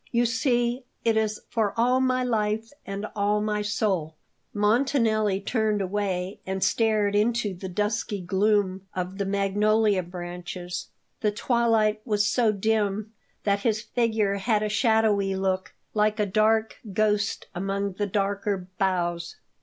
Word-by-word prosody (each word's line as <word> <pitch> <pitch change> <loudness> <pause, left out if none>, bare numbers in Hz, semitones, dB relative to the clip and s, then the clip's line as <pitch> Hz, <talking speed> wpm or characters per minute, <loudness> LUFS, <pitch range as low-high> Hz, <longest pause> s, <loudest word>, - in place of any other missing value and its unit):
You 240 0 +2
see, 240 +1 +1 0.2
it 225 -1 +3
is 215 -1 0
for 220 -4 0
all 250 +2 +3
my 255 -1 +2
life 220 -1 -1 0.2
and 195 +1 -4
all 205 0 +2
my 210 0 -1
soul." 195 -6 -1 0.4
Montanelli 215 -2 +2
turned 215 0 0
away 190 -1 -2
and 190 0 -2
stared 210 +1 +2
into 215 -1 +1
the 185 +1 -7
dusky 210 +2 -1
gloom 195 0 +1
of 185 +2 -4
the 200 - -1
magnolia 205 +1 +2
branches. 175 0 -6 0.3
The 215 - +2
twilight 220 -1 +2
was 210 -3 +1
so 215 +1 +3
dim 215 0 0 0.3
that 200 -1 +2
his 215 0 0
figure 220 -3 0
had 210 +1 +1
a 215 - 0
shadowy 210 -3 +2
look, 190 -2 -1 0.2
like 215 0 +2
a 210 - +3
dark 215 +2 +2 0.2
ghost 210 0 +1
among 195 +2 -2
the 205 +2 -2
darker 200 -1 -1
boughs. 175 -3 0
210 Hz, 140 wpm, -26 LUFS, 195-220 Hz, 0.4 s, it